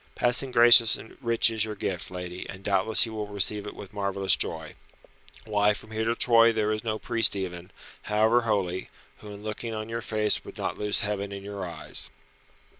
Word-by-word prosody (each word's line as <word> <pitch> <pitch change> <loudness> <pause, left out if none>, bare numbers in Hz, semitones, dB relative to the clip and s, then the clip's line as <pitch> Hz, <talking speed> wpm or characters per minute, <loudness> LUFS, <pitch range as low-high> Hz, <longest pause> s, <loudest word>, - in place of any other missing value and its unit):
"Passing 125 +2 +2
gracious 120 -1 +7
and 110 - -12
rich 115 -1 +1
is 110 -2 +1
your 110 -1 -5
gift, 95 -2 -5
lady, 90 0 -8
and 95 0 -10
doubtless 100 +2 +3
he 115 - -3
will 105 -1 -5
receive 105 +1 +2
it - - -8
with 100 +1 -11
marvellous 100 -1 +2
joy. - - -4 0.7
Why, 105 0 +1
from 110 - -12
here 110 0 -3
to 115 +1 0
Troy 115 -1 +5
there 110 -1 -1
is 110 0 -3
no 110 -2 -2
priest 115 -2 +3
even, 90 -2 -6 0.3
however 110 +3 +2
holy, 100 -5 -2 0.3
who 105 - -12
in 100 0 -11
looking 110 +1 -6
on 110 +1 -6
your 115 +1 -4
face 110 -1 0
would - - -12
not - - -3
lose 105 +1 0
Heaven 100 -2 -3
in 100 0 -8
your 100 -3 -6
eyes." 85 - -3
105 Hz, 195 wpm, -26 LUFS, 100-115 Hz, 0.7 s, gracious